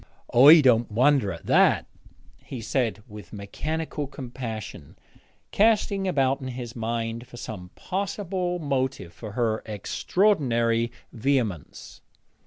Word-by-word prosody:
'I 145 +6 +9
don't 120 -4 +3
wonder 125 -1 +3
at 85 - -9
that,' - - +4 0.6
he 130 - -7
said, 115 -3 -1
with 105 -5 -11
mechanical 150 +9 -4
compassion, 120 - -7 0.5
casting 200 -2 +2
about 135 -5 +1
in 130 - -5
his 125 -1 -7
mind 115 +1 -3
for 120 - -12
some 95 -6 -7
possible 185 -1 -3
motive 130 - -2
for 110 -3 -9
her 110 -2 0
extraordinary 115 - +1 0.2
vehemence. 115 - -2
125 Hz, 110 wpm, -25 LUFS, 110-145 Hz, 0.6 s, I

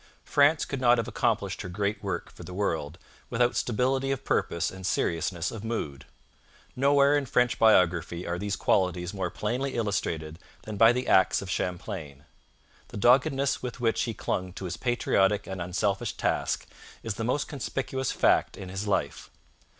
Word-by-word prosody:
France 145 +2 +3
could 135 -2 -4
not 120 -1 +5
have 115 - -1
accomplished 100 -4 -1
her 95 - -6
great 100 +3 -2
work - - -3
for - - -14
the 90 +2 -8
world 80 -5 -2 0.3
without 120 +1 +1
stability 130 +3 0
of 135 -2 -2
purpose 85 - 0
and 95 0 -10
seriousness 85 0 -1
of 110 -2 -7
mood. 75 - -4 0.7
Nowhere 140 +2 +4
in 145 -2 0
French 125 0 +2
biography 90 -5 +3
are 85 +1 -3
these 100 0 -2
qualities 90 -1 +1
more 95 -3 -2
plainly 125 +9 -2
illustrated 85 -8 -2 0.2
than 110 - -6
by 115 +3 +7
the 125 +1 -2
acts 95 - +4
of 95 - -6
Champlain. 85 -7 -4 0.6
The - - -9
doggedness 135 +4 +3
with 125 -1 -6
which 115 -2 +1
he 115 -3 -4
clung 90 -1 -3
to 95 - -7
his 90 -1 -3
patriotic 105 -5 +1
and 95 -2 -5
unselfish 95 +3 -1
task - - -1 0.4
is 115 - -2
the 115 - -4
most 125 +5 0
conspicuous 135 -1 -3
fact - - +2
in 95 - -8
his 95 +3 -4
life. 100 - -1
105 Hz, 165 wpm, -27 LUFS, 90-125 Hz, 0.7 s, by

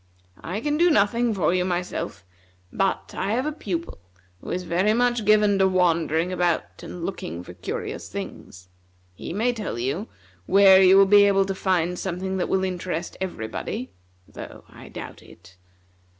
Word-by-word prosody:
I 190 +6 -4
can 295 +3 0
do 350 +2 +4
nothing 230 -1 +2
for 185 -4 +1
you 180 -1 +1
myself, 180 - -4 0.5
but 195 0 -1
I 200 +2 -1
have 255 +4 0
a 305 - -1
pupil 175 - -5 0.4
who - - -10
is 185 - -2
very 185 +5 +1
much 240 -2 +1
given 210 -1 +4
to 190 - +5
wandering 170 -2 +1
about, 175 -2 -1
and 175 -1 -7
looking 85 - -5
for 90 - -11
curious 90 - -6
things. 90 0 -8 0.5
He 90 - -8
may 225 +7 0
tell 215 - -5
you 140 - -2 0.4
where 195 -1 +7
you 190 +1 +7
will 195 - +7
be 205 +1 +6
able 195 -1 +3
to 195 - -2
find 180 -2 0
something 190 +1 -3
that 180 - -2
will 190 0 +1
interest 180 -2 -3
everybody, 125 -6 -5 0.4
though - - -10
I - - -14
doubt - - -9
it. 90 - -17
190 Hz, 165 wpm, -24 LUFS, 175-205 Hz, 0.5 s, where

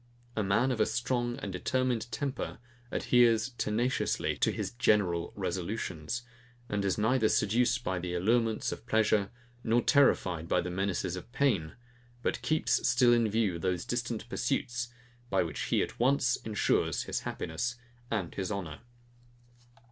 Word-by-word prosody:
A 110 - +1
man 105 +7 +2
of 120 - -2
a 110 - +3
strong 120 0 -1
and 100 - -4
determined 125 +4 -1
temper 135 +3 -3 0.3
adheres 120 -1 +3
tenaciously 120 +5 0
to - - +2
his - - -3
general 100 -8 +2
resolutions, 95 +2 -3 0.4
and 105 -2 -1
is 95 -2 0
neither 110 +1 +3
seduced 120 +3 +2
by 95 -4 -1
the 90 0 -3
allurements 115 +4 +1
of 115 - -8
pleasure, 110 -3 +2 0.3
nor 120 +1 +2
terrified 90 - +3
by - - +2
the 90 - -3
menaces 95 -1 -1
of 90 +6 -9
pain; 115 - +1 0.5
but - - -1
keeps 155 -5 +1
still 125 -1 +5
in 115 -2 +3
view 105 -5 +1
those 90 -1 -1
distant 120 -2 -3
pursuits, 120 -1 -1 0.4
by 95 - +2
which 80 -3 -4
he, - - +2
at - - -7
once, 125 -1 +3
ensures 110 -2 0
his - - -2
happiness 90 +9 -3 0.3
and 100 -7 -2
his 95 0 -3
honour. 85 -7 -4
110 Hz, 150 wpm, -30 LUFS, 95-120 Hz, 0.5 s, still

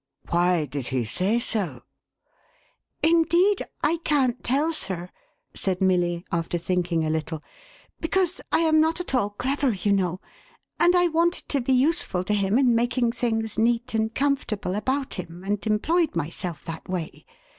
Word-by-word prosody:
"" - - -61
" - - -21
Why 175 -2 +2
did 140 -2 -5
he 130 -3 -1
say 185 - +1
so? 190 - -2 0.4
" - - -38
" - - -47
Indeed 340 +5 +4 0.2
I 325 +3 +2
can't 285 -7 0
tell, 290 +6 +1
sir,1' 180 - -3 0.4
said 185 -2 -1
Milly, 175 -2 +1
after 170 0 -1
thinking 175 -2 0
a - - -1
little, 160 0 -3 0.3
" - - -28
because 355 +2 0
I - - +3
am 315 -1 +4
not 320 +2 +1
at 355 - -2
all 245 -6 +2
clever, 265 +4 0
you 200 +1 0
know; 185 -2 0 0.6
and 350 +1 +5
I 355 0 +4
wanted 335 +2 0
to 280 - +1
be 260 +2 +1
useful 270 - +2
to 210 - -1
him 200 +1 +2
in 255 -3 +4
making 240 +1 +1
things 225 -3 -2
neat 235 +2 +1
and 220 0 0
comfortable 265 -9 -1
about 260 +7 -1
him, 175 0 -8
and 200 +1 -2
employed 310 +10 +1
myself 165 0 -4
that 165 +1 -7
way. 180 -4 -4
220 Hz, 175 wpm, -25 LUFS, 180-285 Hz, 0.6 s, and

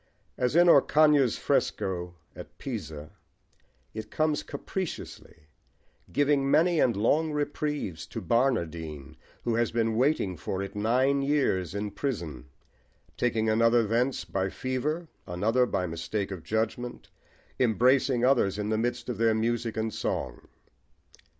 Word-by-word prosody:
As 125 +3 0
in 175 +1 +6
Orcagna's 150 -4 +5
fresco 90 -2 -1 0.2
at - - -11
Pisa, 80 - -6 0.8
it 110 0 -6
comes 155 -1 0
capriciously, 185 - -6 0.7
giving 145 -1 +2
many 170 +3 +4
and 120 -5 +3
long 155 +9 +2
reprieves 145 - -3
to - - -6
Barnardine, 85 - -1 0.3
who 120 - 0
has 115 0 +1
been 115 -1 0
waiting 120 - +1
for 95 +4 -3
it 100 - -7
nine 130 +6 +2
years 130 - 0
in 100 0 -3
prison, 85 - -4 0.7
taking 110 -2 0
another 115 +1 +4
thence 120 0 0
by 95 +3 -1
fever, 145 - -3 0.2
another 110 +8 +1
by 90 - -1
mistake 90 +5 -3
of 95 -3 -6
judgment, 115 +5 -3 0.5
embracing 125 +1 +3
others 115 -7 +3
in 105 0 -2
the 110 0 +1
midst 120 +1 -2
of 120 -4 -4
their 115 -1 +3
music 115 0 -1
and 110 0 -1
song. - - -3
115 Hz, 130 wpm, -28 LUFS, 100-135 Hz, 0.8 s, in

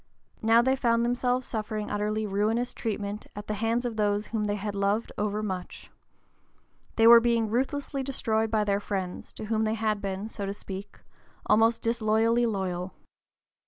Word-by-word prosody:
Now 225 +1 +5
they 260 +1 +3
found 235 -3 +2
themselves 245 +1 0
suffering 215 -1 -4
utterly 210 +1 -1
ruinous 215 +5 0
treatment 210 -2 -4
at 205 0 -7
the 215 - -3
hands 225 +3 0
of 230 -2 -3
those 205 0 +1
whom 215 -1 -2
they 205 0 0
had 205 0 -4
loved 200 +3 0
overmuch. 205 -3 -4 1.0
They 225 - +4
were 235 0 +10
being 230 -2 +1
ruthlessly 275 +3 -1
destroyed 225 -5 -1
by 215 -1 +2
their 200 -1 +1
friends, 190 -3 -4
to - - -7
whom 220 0 0
they 220 0 0
had 215 -2 -1
been, 195 +1 -3
so 205 -3 -5
to 200 - -3
speak, 195 0 -8 0.5
almost 225 +2 +3
disloyally 230 +1 +2
loyal. 190 -3 -3
215 Hz, 160 wpm, -27 LUFS, 205-230 Hz, 1.0 s, were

